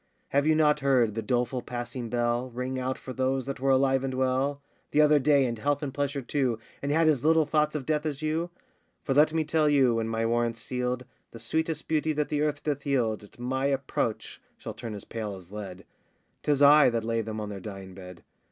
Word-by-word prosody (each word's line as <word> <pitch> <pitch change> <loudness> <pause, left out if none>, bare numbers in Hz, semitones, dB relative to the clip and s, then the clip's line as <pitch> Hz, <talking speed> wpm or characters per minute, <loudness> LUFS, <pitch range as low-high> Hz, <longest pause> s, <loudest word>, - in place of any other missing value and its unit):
Have 140 +2 +2
you 155 - +4
not 150 -1 +3
heard 130 -6 +2
the 115 - -3
doleful 125 +3 -1
passing 120 0 -5
bell 120 +1 0
Ring 125 +2 -4
out 130 +1 -2
for 130 - -8
those 130 0 0
that 135 -1 -5
were 135 +1 0
alive 135 0 +3
and 130 -1 -2
well 130 +2 0 0.3
The 150 - +1
other 150 -1 +6
day, 140 -1 +4
in 120 -2 -2
health 145 +5 -1
and 135 -2 -4
pleasure 140 -1 -2
too, 130 -3 0 0.2
And 140 - -2
had 160 +2 +3
as 145 -5 +2
little 160 0 +4
thoughts 150 0 +1
of 140 -4 -3
death 150 +1 0
as 150 0 -4
you? 160 +3 -1 0.5
For 135 - 0
let 150 +3 +5
me 160 0 +1
tell 155 0 +2
you, 135 -4 +4
when 115 -1 -1
my 115 0 -1
warrant's 115 0 0
sealed, 125 +1 -3 0.2
The 115 - -11
sweetest 160 +7 -2
beauty 155 0 +1
that 150 0 -1
the 150 -1 0
earth 150 -1 -1
doth 145 -2 -2
yield 120 -7 0
At 105 - -16
my 130 +3 -1
approach 130 -5 -2 0.2
shall - - -7
turn 115 -3 -7
as 100 - -8
pale 110 -3 -5
as 95 -1 -13
lead; 100 -3 -8 0.6
'Tis 145 -1 +2
I 145 0 +8
that 115 -2 -1
lay 115 0 0
them 110 0 -5
on 105 -1 -4
their 100 -1 -6
dying 95 -1 -8
bed. 90 -2 -11
130 Hz, 225 wpm, -27 LUFS, 115-145 Hz, 0.6 s, I